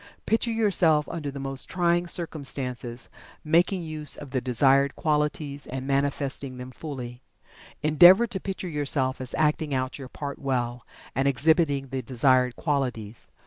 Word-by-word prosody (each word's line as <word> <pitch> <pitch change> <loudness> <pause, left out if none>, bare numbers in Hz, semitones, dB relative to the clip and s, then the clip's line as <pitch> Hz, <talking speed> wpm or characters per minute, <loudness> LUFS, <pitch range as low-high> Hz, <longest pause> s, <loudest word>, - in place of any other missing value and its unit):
Picture 230 +1 +1
yourself 185 -9 +3
under 155 -4 -4
the 140 0 -7
most 135 0 -3
trying 175 -1 +1
circumstances, 135 -8 -3 0.4
making 175 +3 +2
use 155 -3 -3
of 145 -3 -10
the 130 - -1
desired 135 +3 +3
qualities, 150 -2 -1
and 130 +1 -5
manifesting 140 -1 -2
them 125 +1 -8
fully. 125 -4 -7 0.6
Endeavor 175 +8 +7
to 205 -4 -5
picture 190 -1 -5
yourself 140 -4 0
as 130 - -4
acting 150 -2 +1
out 130 +1 -3
your 130 -2 -8
part 140 0 -6
well, 125 -3 -2 0.3
and 135 +2 +1
exhibiting 140 0 +2
the 130 0 -3
desired 125 -1 +2
qualities. 125 -8 -3
140 Hz, 145 wpm, -26 LUFS, 130-155 Hz, 0.6 s, Endeavor